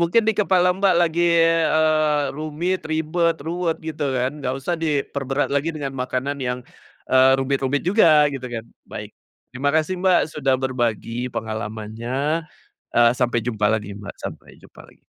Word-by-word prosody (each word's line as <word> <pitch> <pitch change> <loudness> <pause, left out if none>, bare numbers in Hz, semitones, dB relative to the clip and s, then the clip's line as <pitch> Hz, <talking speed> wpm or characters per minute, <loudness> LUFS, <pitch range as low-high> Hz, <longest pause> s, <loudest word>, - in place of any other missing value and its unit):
mungkin 170 +7 +3
dikepala 190 -4 +3
Mbak 195 -1 +3
lagi, 170 0 +2 0.4
eee, 155 -2 +2
rumit, 155 +5 -2
ribet, 160 +2 0
ruwet 170 +1 -1
gitu 155 -2 -4
kan 130 +4 -1
enggak 130 0 -1
usah 170 +6 -2
diperberat 140 -3 -1
lagi 145 +4 +1
dengan 140 -3 -4
makanan 130 +3 -2
yang, 125 0 -2 0.5
eee, 130 0 +6
rumit-rumit 135 +1 0
juga 160 -7 +5
gitu 130 -2 -6
kan, 115 -2 -5 0.2
baik. - - -7 0.4
Terima 145 +3 0
kasih, 160 +3 +1
Mbak, 185 -1 +4 0.2
sudah 135 -2 +2
berbagi 120 -1 -2
pengalamannya, 115 +8 -3 0.5
eee, 120 0 +5
sampai 120 -1 +1
jumpa 110 -4 0
lagi 105 -2 -3
Mbak, 100 -1 -8
sampai - - -8
jumpa - - -15
lagi. - - -23
145 Hz, 145 wpm, -22 LUFS, 125-160 Hz, 0.5 s, eee